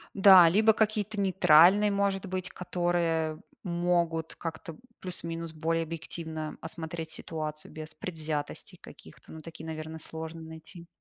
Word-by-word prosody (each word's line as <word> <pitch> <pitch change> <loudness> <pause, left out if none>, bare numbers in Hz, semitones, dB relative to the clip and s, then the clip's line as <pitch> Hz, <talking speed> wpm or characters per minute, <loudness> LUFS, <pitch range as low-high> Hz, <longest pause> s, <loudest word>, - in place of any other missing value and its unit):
Да, 190 -3 +9
либо 215 +5 +5
какие-то 215 -1 0
нейтральные, 190 +1 +6
может 200 -1 0
быть, 185 -1 -3
которые 170 -3 -1 0.2
могут 170 -2 0
как-то, 165 +1 -6
м, - - -18 0.2
плюс-минус 165 -2 -5
более 165 +1 0
объективно 160 -1 -6
осмотреть 160 0 -6
ситуацию 155 -1 -5
без 155 0 -8
предвзятостей 155 -3 -5
каких-то. - - -14
Ну, 160 - -9
такие, 160 0 -10
наверное, 160 0 -6
сложно 160 +1 -7
найти. 160 +2 -11
165 Hz, 125 wpm, -29 LUFS, 160-180 Hz, 0.2 s, Да